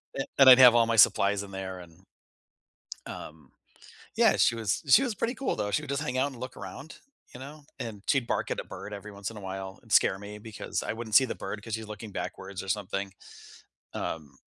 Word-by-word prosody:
and 135 - -3
and 135 -1 +9
I'd 125 - +11
have 125 -2 +9
all 115 -1 +4
my 115 - +1
supplies 100 0 +5
in 100 - -11
there, 95 -1 -6
and 85 +1 -15 1.0
um 75 -4 -10 0.6
Yeah, - - +4
she 115 - +3
was 110 -3 -1
she 265 - +7
was 235 -5 -2
pretty 235 +6 -2
cool, 270 - -2
though. 105 0 -2
She 150 - +1
would 140 - -9
just 140 +1 -1
hang 130 -3 -3
out 140 +2 +1
and 120 - -12
look 130 -1 -7
around, 155 +4 -9 0.3
you 125 - -10
know, 145 +3 -10 0.2
and 105 -4 -6
she'd 130 -4 +1
bark - - -1
at - - -2
a - - -4
bird 105 - -9
every 105 +1 -8
once 100 +2 -6
in 110 - -11
a - - -8
while, 95 0 -7
and 115 -4 -18
scare 95 0 +4
me 105 +1 -9
because 110 -1 -5
I - - -3
wouldn't 110 -2 -4
see 130 - +8
the - - -5
bird 105 +2 -6
'cause 115 - -7
she's 110 -1 -7
looking 105 0 -8
backwards 95 0 -6
or 95 - -8
something, 100 -1 -3 0.8
um 70 -4 -5
105 Hz, 230 wpm, -28 LUFS, 95-125 Hz, 1.0 s, I'd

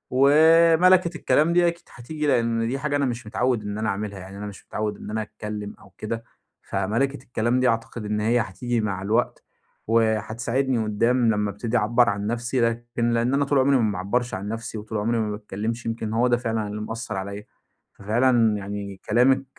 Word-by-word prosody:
ومَلَكِة 165 +5 +5
الكلام 150 +4 +2
دي 175 0 +4
أكيد 170 0 -3
هتيجي، 150 +5 -4
لإن 115 -3 +1
دي 135 +4 -2
حاجة 145 0 -1
أنا 145 - +1
مش 120 -3 -4
متعوّد 120 0 0
إن 105 0 -4
أنا 110 0 -1
أعملها. 100 -1 -4
يعني 95 +2 -10
أنا 105 - -6
مش 100 - -11
متعوّد 105 -1 -3
إن - - -9
أنا 110 0 -1
أتكلّم 105 -1 -6
أو - - -17
كده، 115 +1 -4 0.4
فمَلَكةِ 115 +8 -1
الكلام 120 0 0
دي 130 - +3
أعتقد 115 0 -3
إن 105 0 -1
هي 115 +3 +2
هتيجي 115 +3 -2
مع 95 -3 -2
الوقت 110 +5 0 0.4
وهتساعدني 115 +3 +1
قدّام 115 +4 +1
لمّا 105 -1 -1
أبتدي 110 +4 -2
أعبّر 115 +1 +3
عن 100 0 -2
نفسي 120 +2 -1
لكن 120 0 -1
لإن 120 +3 +1
أنا 140 0 +2
طول 140 -1 +2
عمري 135 +1 +4
ما 110 -4 +1
باعبّرش 100 +6 -2
عن 95 +2 -4
نفسي 115 0 -5
وطول 110 +1 -5
عمري 115 +2 0
ما 105 -1 -1
باتكلّمش، 110 +3 -4
يمكن 115 -1 -3
هو 120 +2 +3
ده 120 -1 +3
فعلًا 115 -3 -2
اللي 105 +1 -5
مأثّر 110 -1 -5
عليّا. 100 +2 -5 0.5
ففعلًا 115 0 +2
يعني 100 -1 -6
كلامِك 130 +4 +4
115 Hz, 190 wpm, -24 LUFS, 105-125 Hz, 0.5 s, ومَلَكِة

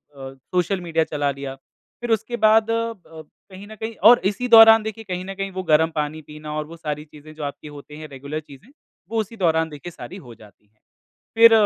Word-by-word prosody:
अ, 135 0 -9 0.2
social 180 +1 +1
media 165 -2 0
चला 145 -1 -1
लिया। 135 -1 -7 0.5
फिर 240 -1 -3
उसके 230 +2 -1
बाद 220 +1 +5
अब 230 -3 -2 0.5
कहीं 190 +2 -10
न 220 - -11
कहीं 220 +1 -6
और 245 - +7
इसी 210 +5 -1
दौरान 225 -1 +8
देखिए, 220 +1 -6
कहीं 185 -2 -5
न 195 - -6
कहीं 195 0 -4
वो 185 0 -5
गरम 160 0 +3
पानी 150 +1 -3
पीना 150 0 -9
और 155 - -3
वो 165 +1 -11
सारी 150 -1 -5
चीज़ें 150 +1 -14
जो 155 - -7
आपकी 145 +1 -6
होती 150 +1 -11
है, 155 - -8
रेगुलर 140 +2 -6
चीज़ें, 145 - -16 0.4
वो 225 - -1
उसी 220 +2 -9
दौरान 160 -4 +1
देखिए 155 +3 -9
सारी 185 - -10
हो 115 - -11
जाती 105 -1 -19
है। 105 +1 -42 0.6
फिर 230 0 +8
165 Hz, 215 wpm, -22 LUFS, 150-215 Hz, 0.6 s, दौरान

